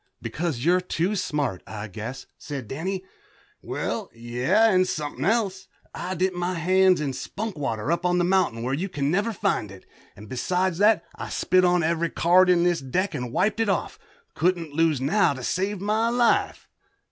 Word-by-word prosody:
"Because 155 Hz, -6 st, -3 dB
you're 180 Hz, +2 st, +4 dB
too 180 Hz, +2 st, -1 dB
smart, 145 Hz, -, -2 dB
I 110 Hz, 0 st, -6 dB
guess," 110 Hz, +6 st, -7 dB
said 140 Hz, -6 st, -7 dB
Danny. 185 Hz, -, -4 dB, 0.6 s
"Well, -, -, -3 dB
yeah, 125 Hz, -, +2 dB
and 185 Hz, -1 st, +3 dB
somethin' 155 Hz, -6 st, -3 dB
else. 195 Hz, -4 st, 0 dB, 0.3 s
I 185 Hz, +1 st, -4 dB
dipped 185 Hz, +1 st, 0 dB
my 175 Hz, +1 st, -2 dB
hands 185 Hz, +2 st, +3 dB
in 145 Hz, -3 st, -2 dB
spunk 205 Hz, -, -5 dB
water, 135 Hz, -3 st, -2 dB
up 170 Hz, +1 st, 0 dB
on 180 Hz, 0 st, +2 dB
the 175 Hz, -, +2 dB
mountain 175 Hz, -11 st, +1 dB
where 130 Hz, +2 st, -1 dB
you 180 Hz, +8 st, -2 dB
can 145 Hz, -3 st, -1 dB
never 205 Hz, +6 st, +1 dB
find 110 Hz, -, -1 dB
it, 95 Hz, -1 st, -13 dB, 0.3 s
and 105 Hz, +2 st, -12 dB
besides 180 Hz, -, -1 dB
that 210 Hz, +1 st, +4 dB
I -, -, -6 dB
spit 185 Hz, +1 st, +2 dB
on 180 Hz, -1 st, +3 dB
ever' 165 Hz, +1 st, 0 dB
card 180 Hz, +2 st, +4 dB
in 175 Hz, -1 st, +4 dB
this 175 Hz, -1 st, +2 dB
deck 180 Hz, +9 st, -1 dB
and 125 Hz, -1 st, -4 dB
wiped 210 Hz, -, +1 dB
it 225 Hz, -2 st, +1 dB
off. 190 Hz, -, -1 dB, 0.3 s
Couldn't 170 Hz, -2 st, 0 dB
lose 160 Hz, -2 st, +2 dB
now 150 Hz, +5 st, +2 dB
to 130 Hz, -, -8 dB
save 195 Hz, +7 st, -1 dB
my 215 Hz, +4 st, +1 dB
life." 240 Hz, 0 st, +1 dB
175 Hz, 180 wpm, -25 LUFS, 140-190 Hz, 0.6 s, you're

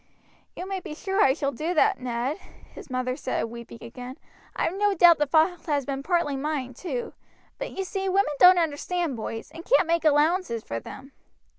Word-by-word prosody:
"You 365 Hz, -, -6 dB
may 385 Hz, -1 st, -3 dB
be 310 Hz, -4 st, -8 dB
sure 385 Hz, +5 st, -1 dB
I 265 Hz, 0 st, +4 dB
shall 280 Hz, -3 st, -1 dB
do 315 Hz, +7 st, -3 dB
that, 405 Hz, +5 st, +3 dB
Ned," 250 Hz, +4 st, -2 dB, 0.4 s
his -, -, -11 dB
mother 255 Hz, 0 st, -2 dB
said, 260 Hz, -2 st, -2 dB
weeping 235 Hz, 0 st, -8 dB
again. 250 Hz, +2 st, -9 dB, 0.4 s
"I -, -, -1 dB
have 330 Hz, -, 0 dB
no 405 Hz, +1 st, +1 dB
doubt 340 Hz, -2 st, +7 dB
the 295 Hz, -, +2 dB
fault 320 Hz, +4 st, +2 dB
has 290 Hz, -3 st, 0 dB
been 275 Hz, -1 st, -3 dB
partly 340 Hz, -2 st, 0 dB
mine 270 Hz, -2 st, -3 dB
too, 460 Hz, -, -5 dB, 0.5 s
but -, -, -4 dB
you 385 Hz, -, -3 dB
see 385 Hz, 0 st, -3 dB
women 375 Hz, -5 st, +2 dB
don't 360 Hz, 0 st, +8 dB
understand 330 Hz, -1 st, -1 dB
boys, 225 Hz, 0 st, -6 dB
and 330 Hz, -, -9 dB
can't 420 Hz, -6 st, +3 dB
make 335 Hz, 0 st, +1 dB
allowances 305 Hz, -, +2 dB
for 115 Hz, -, -4 dB
them." 270 Hz, -, -11 dB
310 Hz, 195 wpm, -26 LUFS, 260-360 Hz, 0.5 s, don't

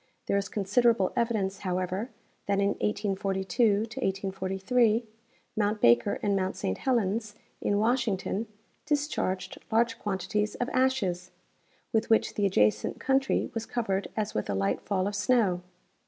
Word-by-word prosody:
There -, -, 0 dB
is 200 Hz, -1 st, 0 dB
considerable 210 Hz, 0 st, +2 dB
evidence, 215 Hz, -5 st, 0 dB
however, 185 Hz, +4 st, -2 dB, 0.4 s
that 200 Hz, 0 st, +2 dB
in 200 Hz, 0 st, +3 dB
1842 200 Hz, +1 st, +1 dB, 0.5 s
'43 210 Hz, +5 st, +1 dB, 0.5 s
mount 210 Hz, 0 st, +1 dB
Baker 120 Hz, +9 st, +4 dB
and 200 Hz, -1 st, +2 dB
mount 190 Hz, 0 st, -1 dB
Saint 95 Hz, -, -2 dB
Helens, 215 Hz, -3 st, 0 dB, 0.3 s
in 205 Hz, -, +1 dB
Washington, 220 Hz, -2 st, 0 dB, 0.4 s
discharged 285 Hz, -, -1 dB
large 230 Hz, +1 st, +2 dB
quantities 210 Hz, +1 st, -1 dB
of 245 Hz, -, -2 dB
" -, -, -9 dB
ashes 185 Hz, -9 st, -1 dB, 0.3 s
" -, -, -38 dB
with 220 Hz, 0 st, +1 dB
which 225 Hz, -, +3 dB
the 205 Hz, -1 st, +1 dB
adjacent 105 Hz, -, +1 dB
country 270 Hz, 0 st, +1 dB
was 225 Hz, 0 st, -4 dB
covered 200 Hz, -5 st, -1 dB
as 215 Hz, -1 st, -1 dB
with 105 Hz, -, -2 dB
a 100 Hz, -, 0 dB
light 100 Hz, +1 st, 0 dB
fall 190 Hz, -2 st, -1 dB
of 205 Hz, -, -2 dB
snow. 205 Hz, -5 st, +2 dB
205 Hz, 140 wpm, -28 LUFS, 190-230 Hz, 0.5 s, Baker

